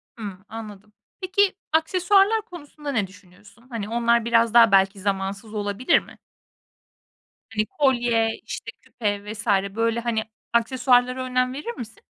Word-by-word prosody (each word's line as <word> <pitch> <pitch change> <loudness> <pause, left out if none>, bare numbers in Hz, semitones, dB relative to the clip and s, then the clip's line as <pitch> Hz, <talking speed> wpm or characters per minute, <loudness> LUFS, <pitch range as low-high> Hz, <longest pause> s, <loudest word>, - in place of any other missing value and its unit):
Hımm, 200 -4 -8
anladım. 210 -2 -9 0.3
Peki 380 +1 +2 0.2
aksesuarlar 385 +6 +3
konusunda 300 -7 -8
ne 215 -7 0
düşünüyorsun? 200 +4 -19
Hani, 220 -4 -5
onlar 235 0 +2
biraz 230 -1 +3
daha 230 -3 +7
belki 195 +1 +4
zamansız 195 +2 -3
olabilir 205 +3 +1
mi? - - -15 1.4
Hani, 215 0 +1
kolye, 240 -4 +1
işte, 230 - -6
küpe 205 -4 -3
vs. 220 +2 -9 0.3
böyle, 230 +1 +1
hani, 230 -2 -1 0.3
aksesuarlara 250 +1 +2
önem 255 0 0
verir 295 - -5
misin? 225 -2 -9
230 Hz, 130 wpm, -24 LUFS, 210-255 Hz, 1.4 s, daha